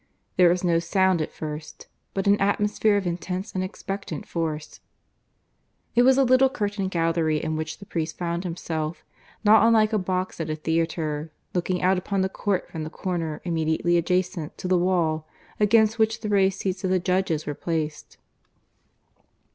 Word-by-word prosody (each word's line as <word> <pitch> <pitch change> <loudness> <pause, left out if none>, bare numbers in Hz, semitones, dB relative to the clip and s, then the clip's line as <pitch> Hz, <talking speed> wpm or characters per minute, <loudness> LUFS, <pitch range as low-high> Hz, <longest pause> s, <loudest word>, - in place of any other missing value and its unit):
There 180 -1 +6
was 180 +1 +1
no 170 -2 +3
sound 185 0 +2
at 155 - -3
first, 155 0 -7 0.3
but 195 - -1
an 200 0 +4
atmosphere 205 +1 +2
of 200 - -2
intense 180 +3 -3
and 185 - -1
expectant 195 -4 -5
force. 160 -2 -4 1.1
It 240 - +5
was 260 +1 +5
a 275 - +5
little 255 +1 +5
curtained 205 -7 -2
gallery 165 -3 +1
in 155 +1 -2
which 160 0 -4
the 200 - -12
priest 160 -4 -3
found 170 0 -2
himself, 165 -2 -4 0.4
not 215 0 +7
unlike 225 -1 +4
a 215 - +3
box 185 -1 -2
at 160 -1 -3
a 155 - -1
theatre, 160 -1 -1 0.2
looking 180 0 -1
out 185 0 +3
upon 195 +1 -1
the 190 - +1
court 190 -1 -1
from 160 -2 -6
the 155 - -5
corner 165 -3 -3
immediately 165 0 +1
adjacent 175 -1 0
to - - -5
the 185 - +3
wall 170 -3 +1 0.3
against 220 +1 +4
which 220 +1 +2
the 215 - -3
raised 195 -1 +2
seats 190 0 -2
of 185 - 0
the 185 - +3
judges 180 -3 0
were 145 - -2
placed. 155 -1 -4
180 Hz, 170 wpm, -25 LUFS, 160-200 Hz, 1.1 s, not